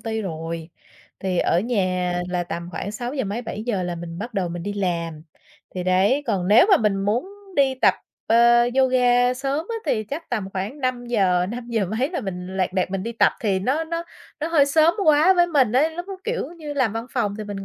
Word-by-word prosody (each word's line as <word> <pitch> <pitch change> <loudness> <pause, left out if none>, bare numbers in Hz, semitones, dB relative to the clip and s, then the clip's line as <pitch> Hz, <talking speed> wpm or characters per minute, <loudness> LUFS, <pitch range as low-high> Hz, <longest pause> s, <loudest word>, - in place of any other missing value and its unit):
ty 220 0 -3
rồi, 165 -1 -5 0.5
thì 185 -2 -1
ở 175 - +2
nhà 185 -6 0 0.2
là 180 -1 -1
tầm 170 0 -5
khoảng 200 +3 -5
sáu 245 +3 -5
giờ 265 -6 -1
mấy, 210 +5 -3
7:00 215 -4 -3
là 175 -1 -3
mình 170 0 -7
bắt 230 +2 -6
đầu 185 -3 0
mình 170 0 -5
đi 205 - -3
làm. 170 -5 -2 0.5
Thì 180 - -3
đấy, 195 +10 +3
còn 195 -5 -1
nếu 230 - +7
mà 385 - +8
mình 210 - +1
muốn 210 - -1 0.3
đi 270 -2 +3
tập, 260 - +3 0.3
ờ, 235 +1 +5 0.2
yoga 250 -1 +4
sớm 275 +5 -2
á 460 - -3
thì 215 -1 0
chắc 285 +8 -7
tầm 210 -5 -2
khoảng 205 +10 -4
5:00, 235 -8 +1
năm 240 +3 -6
giờ 220 -5 0
mấy 270 +6 0
là 345 - -3
mình 185 -2 -6
lẹt 185 -1 0
đẹt 185 -1 0
mình 195 -1 -2
đi 230 +3 -4
tập, 230 - +3
thì 195 -4 +1
nó 270 +11 0
nó 335 +1 -3 0.4
nó 315 - -1
hơi 295 -4 +4
sớm 315 +3 +4
quá 310 +5 +6
với 350 -1 +4
mình 270 -9 +2
ấy, 290 +6 +3
lúc 350 +3 -7
đó, 390 - -5
kiểu 475 +2 -2
như, 295 -2 -6
làm 250 -7 +1
văn 225 +1 -4
phòng 210 -5 -1
thì 215 - -4
mình 200 -1 -6
225 Hz, 225 wpm, -23 LUFS, 185-265 Hz, 0.5 s, mà